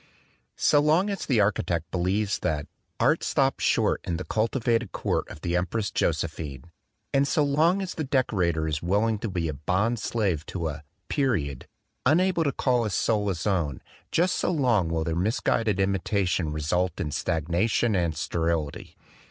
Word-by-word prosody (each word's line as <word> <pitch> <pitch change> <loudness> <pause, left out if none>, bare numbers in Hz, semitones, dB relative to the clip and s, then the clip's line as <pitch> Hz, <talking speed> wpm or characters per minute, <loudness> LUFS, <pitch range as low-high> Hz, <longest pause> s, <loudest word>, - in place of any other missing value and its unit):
So 145 - +4
long 160 +7 +3
as 200 - -4
the 125 -6 +3
architect 90 -4 0
believes 95 +3 0
that 75 -2 -1 0.3
"art - - +3
stopped - - +1
short - - +2
in 85 -2 -2
the 90 - -4
cultivated 115 0 0
court - - -1
of - - -10
the 85 0 -1
Em 90 0 +1
press 110 -1 -2
Josephine," 75 -4 -2 0.5
and 140 0 +3
so 150 +1 +2
long 160 +7 +2
as 185 - -5
the 160 - -3
decorator 95 - +1
is 75 -1 -2
willing 105 +5 +1
to 110 - -3
be 85 -3 -2
a 75 - -2
bond 95 - 0
slave 100 -10 -1
to 85 -4 -3
a 75 0 -7 0.2
"period," 95 - -1 0.4
unable 170 +4 +3
to 140 - +1
call 125 -2 +1
his 105 -5 -2
soul 105 -2 +1
his 90 -5 -2
own, 85 -10 0 0.3
just 180 +3 +2
so - - 0
long 125 - +2
will 80 -1 0
their 80 0 -2
misguided 105 +2 +1
imitation 95 -3 0
result 80 +4 -1
in 75 - -2
stagnation 85 +9 0
and 85 -5 0
sterility. 80 -3 -2
95 Hz, 170 wpm, -26 LUFS, 85-120 Hz, 0.5 s, So